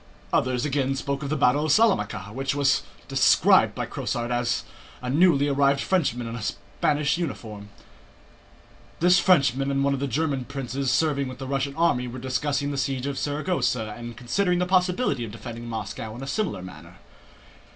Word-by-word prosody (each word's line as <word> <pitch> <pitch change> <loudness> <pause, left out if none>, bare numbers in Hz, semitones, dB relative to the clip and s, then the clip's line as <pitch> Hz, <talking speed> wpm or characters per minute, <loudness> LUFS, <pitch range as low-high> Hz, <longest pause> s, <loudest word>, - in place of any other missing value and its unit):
Others 125 +1 +1
again 135 -2 0
spoke 140 +1 -3
of 140 - -4
the 155 - 0
battle 140 +3 +3
of 155 - +1
Salamanca, 170 - +2
which 135 +2 -2
was 140 - +3 0.3
described - - +4
by - - -2
Crosart, 120 0 -2 0.4
a 125 - -5
newly 145 -2 +4
arrived 140 0 +2
Frenchman 140 -10 0
in 115 0 -5
a 115 - -6
Spanish 145 - -1
uniform. 110 -10 -5 1.3
(This 180 +2 +5
Frenchman 140 -6 +3
and 140 0 +1
one 140 0 +2
of 135 - -2
the 140 - -1
German 140 -1 -1
princes 135 0 -3
serving 140 +1 +1
with 130 -1 -7
the 135 - -6
Russian 140 +1 -2
army 160 -7 +1
were 120 +1 -7
discussing 140 +3 -1
the 140 - -2
siege 135 -1 -2
of 140 -1 -3
Saragossa 145 - -1
and 120 -1 -8
considering 180 - 0
the 180 - +1
possibility 180 - +1
of 115 - -5
defending 115 +1 -8
Moscow 110 0 -5
in 125 - -7
a - - -6
similar 145 - -2
manner.) 85 -1 -11
135 Hz, 170 wpm, -25 LUFS, 120-150 Hz, 1.3 s, This